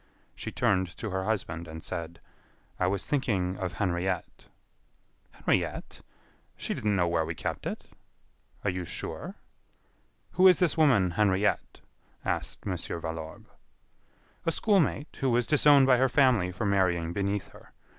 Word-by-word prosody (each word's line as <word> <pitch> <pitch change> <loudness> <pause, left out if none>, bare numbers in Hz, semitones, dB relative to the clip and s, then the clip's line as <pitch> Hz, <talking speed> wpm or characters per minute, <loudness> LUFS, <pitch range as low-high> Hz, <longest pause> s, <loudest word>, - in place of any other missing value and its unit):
She - - -6
turned 95 -1 0
to 110 - -5
her 95 0 -2
husband, 85 -6 -2
and 80 0 -9
said: 85 0 -6 0.6
"I 90 - +2
was 100 +1 -1
thinking 100 -10 0
of 90 -3 -3
Henriette." 90 -2 -2 0.8
"Henriette? - - -2 0.6
She - - -2
didn't 105 -1 0
know 90 -3 +2
where 85 -1 +1
we 80 +1 -4
kept - - -4
it." - - -5 0.8
"Are 100 - +1
you 90 0 -4
sure?" 85 - -5 1.0
"Who 185 - +6
is 180 - +7
this 180 -4 +2
woman 125 - +4
Henriette?" 100 +2 +1 0.4
asked - - -3
Mon. 95 -3 -1
Valorbe. 80 -1 -6 1.0
"A 165 - +1
school 205 +4 +3
mate, 150 -2 -1
who 135 - +1
was 120 0 +2
disowned 145 +1 +6
by 130 -1 +5
her 130 +1 +3
family 125 -8 +3
for 90 +4 -4
marrying 90 -4 +1
beneath 100 +1 -2
her. - - -17
95 Hz, 145 wpm, -28 LUFS, 90-125 Hz, 1.0 s, is